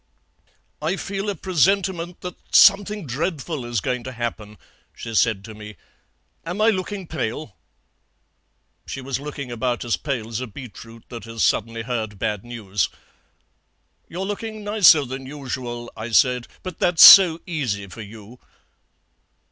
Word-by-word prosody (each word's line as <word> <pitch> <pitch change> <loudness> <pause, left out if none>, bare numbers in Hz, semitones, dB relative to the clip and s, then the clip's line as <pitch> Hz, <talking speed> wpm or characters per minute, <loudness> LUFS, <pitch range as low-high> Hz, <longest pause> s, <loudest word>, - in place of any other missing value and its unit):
'I 160 +5 0
feel 200 +1 -4
a 200 - -2
presentiment 180 0 0
that 180 -1 -6 0.2
something 205 -1 +5
dreadful 150 +1 -3
is 120 -2 -2
going 125 +5 -2
to 130 - -5
happen,' 110 -3 -5 0.4
she 115 - -7
said 110 -3 +1
to 110 - -9
me; 105 0 -10 0.7
'am 175 +4 -5
I 220 +1 +5
looking 190 0 -4
pale?' 130 - -5 1.3
"She - - -5
was 135 -1 -4
looking 140 -3 -7
about 120 +1 -2
as 120 - 0
pale 125 -7 -3
as 115 0 -3
a 130 - -4
beetroot 115 0 -11
that 115 -1 -8
has 115 -1 -3
suddenly 115 +1 0
heard 110 -4 -4
bad 105 0 -2
news. 105 -6 -2 1.2
"'You're 185 +3 -4
looking 215 +1 -5
nicer 205 -8 +5
than 130 +1 -7
usual,' 125 -4 -6
I 110 +1 -6
said, 125 +1 +3 0.2
'but 185 - -7
that's 175 -2 +5
so 175 -5 +10
easy 130 - -3
for 100 +4 -10
you.' 110 +3 -12
130 Hz, 145 wpm, -22 LUFS, 115-175 Hz, 1.3 s, so